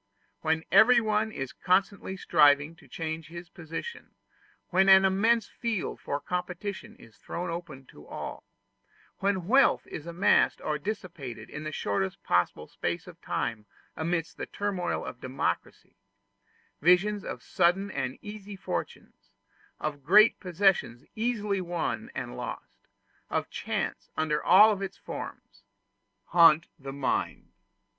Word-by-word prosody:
When 160 0 0
everyone 220 0 +5
is 135 -9 -5
constantly 190 +1 0
striving 145 -1 +4
to 155 -4 -18
change 160 +3 -5
his 170 +2 -9
position 175 - -8 0.5
when 190 +2 +4
an 190 0 +8
immense 215 +4 +3
field 230 -6 -3
for 145 - -2
competition 180 +5 -5
is 115 - -18
thrown 175 0 -5
open 165 -6 -7
to 75 - -15
all - - -7 0.8
when 195 -3 0
wealth 265 +7 +4
is 160 - -8
amassed 170 +3 +3
or 150 -1 -2
dissipated 150 - -6
in 150 +1 -6
the 155 - -3
shortest 100 -8 -2
possible 90 -3 +1
space 85 0 -3
of - - -13
time 110 -2 -3 0.3
amidst 165 +1 -2
the - - -5
turmoil 200 -3 -2
of - - -8
democracy, 130 -9 -3 0.8
visions 190 +5 +4
of - - -6
sudden 195 +4 +1
and 130 -6 -3
easy 210 -1 -8
fortunes 90 - -6 0.5
of 145 -2 -4
great 210 +9 +6
possessions 180 - +1
easily 215 -4 -1
won 175 -1 -3
and - - -5
lost - - -8 0.4
of - - -2
chance, - - -3
under 155 -1 0
all 200 +3 +6
its 195 -1 -5
forms - - -8 0.7
haunt 165 -1 +6
the 135 0 -7
mind. 135 -1 -2
175 Hz, 130 wpm, -28 LUFS, 150-200 Hz, 0.8 s, an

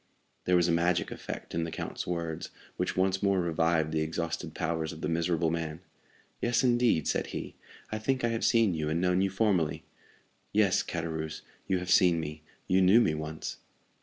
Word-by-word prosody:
There 90 - +3
was 90 -1 +4
a - - +2
magic 85 0 +1
effect - - -7
in 85 - 0
the 85 - -3
count's 80 - -5
words, 85 -2 -3 0.3
which - - -2
once 95 +1 +2
more 100 -2 +2
revived 80 -2 +1
the 80 0 0
exhausted 85 +1 -3
powers 80 -1 -1
of - - -10
the - - -1
miserable 85 0 +1
man. 80 -2 -3 0.6
"Yes, 120 +1 +2
indeed," 120 - +3
said - - 0
he; - - -6 0.4
"I 110 - -2
think 130 +3 0
I 120 - +3
have 115 -1 -2
seen 115 -5 +4
you 80 -2 -2
and 80 +2 0
known 90 +1 +2
you 95 - +2
formerly." 95 -6 +1 0.7
"Yes, - - +4
Caderousse, 80 -1 -4 0.2
you 95 - +2
have 90 0 -3
seen 90 -2 +5
me; 75 -1 -5 0.2
you 95 +1 +3
knew 95 +5 +7
me 80 - +3
once." 75 0 -5
85 Hz, 190 wpm, -29 LUFS, 80-95 Hz, 0.7 s, knew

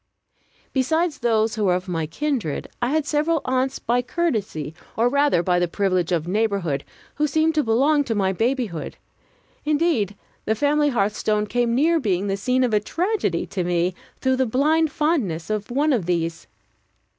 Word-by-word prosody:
Besides 315 +4 +1
those 225 -2 +1
who 215 -2 -1
were 180 -2 +3
of 180 +1 -4
my 165 -3 -2
kindred, 230 - -2
I 245 - +1
had 310 +1 +1
several 310 +2 +1
aunts 260 +1 0
by 240 +2 0
courtesy, 220 - -2 0.2
or 230 +2 +3
rather 280 -8 +2
by 180 0 +2
the 175 - +1
privilege 185 -1 0
of 170 -2 0
neighborhood, 195 -8 0 0.3
who 300 - +2
seemed 315 +2 +2
to 305 -1 +2
belong 275 +6 +3
to 225 - -1
my 190 -2 +1
babyhood. 225 - -2 0.7
Indeed, 295 - +1 0.3
the 220 - +1
family 290 +4 +2
hearthstone 210 -2 0
came 235 +1 0
near 325 +5 +3
being 195 - 0
the 195 -1 0
scene 250 +6 +1
of 245 -3 0
a 210 - +4
tragedy 335 - -1
to 185 - -3
me, 175 +1 0 0.3
through 260 -1 +2
the 260 -1 +1
blind 305 +6 +2
fondness 215 - -1
of 215 +1 -2
one 285 +4 +2
of 205 -9 -1
these. 165 -2 -2
230 Hz, 170 wpm, -23 LUFS, 190-290 Hz, 0.7 s, a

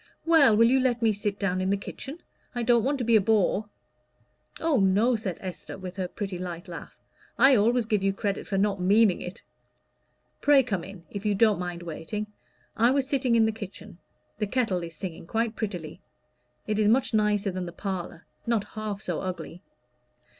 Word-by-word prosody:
"Well, 295 -10 +6
will 230 - +6
you 265 +2 +4
let 245 -2 +1
me 220 -1 +4
sit 205 0 -2
down 185 -2 -1
in 185 - 0
the 200 - +2
kitchen? 275 - -8 0.3
I 240 - -1
don't 235 -1 +4
want 280 +3 +1
to 255 - -2
be 230 0 +3
a 215 - +6
bore." 210 0 +1 0.9
"Oh, 320 -6 +2
no," 205 +6 +3
said 205 -6 -3
Esther, 185 0 -7
with 185 0 -8
her 185 -1 -1
pretty 195 -1 -5
light 175 +1 -6
laugh, 170 -2 -9 0.4
"I 270 0 +7
always 235 +2 +3
give 210 -2 +1
you 195 0 +2
credit 200 0 -3
for 195 - -1
not 200 -1 +1
meaning 200 +1 +4
it. 180 - -8 1.0
Pray 285 -2 +6
come 195 -8 -2
in, 190 -3 -11
if 200 -1 -5
you 210 -1 +1
don't 215 -1 +3
mind 175 -1 -5
waiting. 170 +6 -5 0.5
I 230 +2 +4
was 270 0 +1
sitting 265 -4 +1
in 225 -1 +5
the 220 - +1
kitchen: 205 -3 -10 0.4
the 210 - 0
kettle 225 -6 0
is 165 -1 -7
singing 165 -1 -7
quite 225 +2 -1
prettily. 180 -9 -5 0.6
It 215 0 -1
is 210 - +3
much 245 +3 +2
nicer 210 -2 +2
than 185 -1 -4
the - - -6
parlor 180 -2 -5 0.2
not 230 -3 +1
half 215 -2 -4
so 175 -3 -2
ugly." 180 -2 -6
205 Hz, 195 wpm, -27 LUFS, 185-230 Hz, 1.0 s, I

